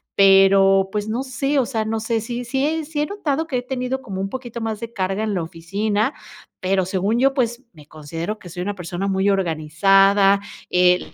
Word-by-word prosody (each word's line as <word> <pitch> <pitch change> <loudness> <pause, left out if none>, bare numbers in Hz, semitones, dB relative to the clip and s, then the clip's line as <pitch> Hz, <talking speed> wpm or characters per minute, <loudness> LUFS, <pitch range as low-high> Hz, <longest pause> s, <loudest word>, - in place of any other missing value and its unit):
pero, 195 0 +5
pues 210 0 -2
no 235 +5 -2
sé, 275 +2 -1
o 250 - +2
sea, 220 -4 -2
no 220 0 -2
sé 225 0 0
si 240 +2 -5
si 285 +6 -1
si 295 0 -3
he - - +1
notado 320 -5 -2
que 260 -6 -1
he - - -1
tenido 255 +1 -3
como 195 -7 -6
un 195 - -1
poquito 240 -1 -6
más 220 -1 -3
de 230 0 -6
carga 195 0 -2
en 215 - -1
la 170 - -1
oficina, 205 - -2 0.5
pero 190 0 +1
según 195 +5 0
yo, 270 +1 +3
pues 240 -1 -1
me 150 -4 -16
considero 165 +7 -6
que 175 - -11
soy 180 +1 -6
una 205 +1 -3
persona 180 +1 -4
muy 195 +1 +1
organizada, 195 +3 +3 0.3
eh, 180 0 +3
205 Hz, 205 wpm, -21 LUFS, 190-250 Hz, 0.5 s, pero